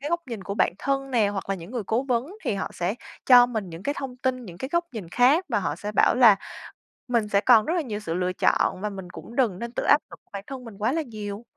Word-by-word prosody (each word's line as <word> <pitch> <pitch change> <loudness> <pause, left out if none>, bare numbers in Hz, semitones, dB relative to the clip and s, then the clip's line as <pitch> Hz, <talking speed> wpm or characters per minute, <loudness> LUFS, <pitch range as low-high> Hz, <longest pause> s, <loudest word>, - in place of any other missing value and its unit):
cái 290 +3 -4
góc 340 0 +1
nhìn 230 -6 -6
của 200 +2 -5
bạn - - +2
thân 275 0 -1
nè, 220 -5 +3
hoặc 200 -1 -5
là 195 - 0
những 175 +2 -10
người 240 -4 -3
cố 225 +3 +1
vấn 270 - -2
thì 230 -6 0
họ 195 - -3
sẽ 180 +4 -2 0.3
cho 245 -1 +8
mình 220 -6 -4
những 165 +3 -9
cái 285 - -1
thông 260 -2 -6
tin, 255 -1 -2
những 175 -3 -11
cái 265 - -4
góc 340 0 +2
nhìn 200 -7 -7
khác, 265 - +4
và 225 - +1
họ - - -2
sẽ 210 +1 -5
bảo - - +4
là 235 -5 +7 0.7
mình 235 -3 +1
sẽ 200 -1 +2
còn 230 -4 +6
rất 330 - 0
là 350 - +1
nhiều 215 -7 -5
sự 165 -6 -4
lựa 180 +1 -1
chọn, 185 - +1
và 210 - -2
mình 190 -3 -8
cũng 230 +6 -11
đừng 220 -9 +1
nên 235 0 -5
tự - - -3
áp 290 - +5
lực - - -11
bản 200 -1 -6
thân 265 -2 -7
mình 220 -4 -11
quá 220 +4 0
là 325 - 0
nhiều. 215 -5 -7
230 Hz, 285 wpm, -25 LUFS, 200-260 Hz, 0.7 s, cho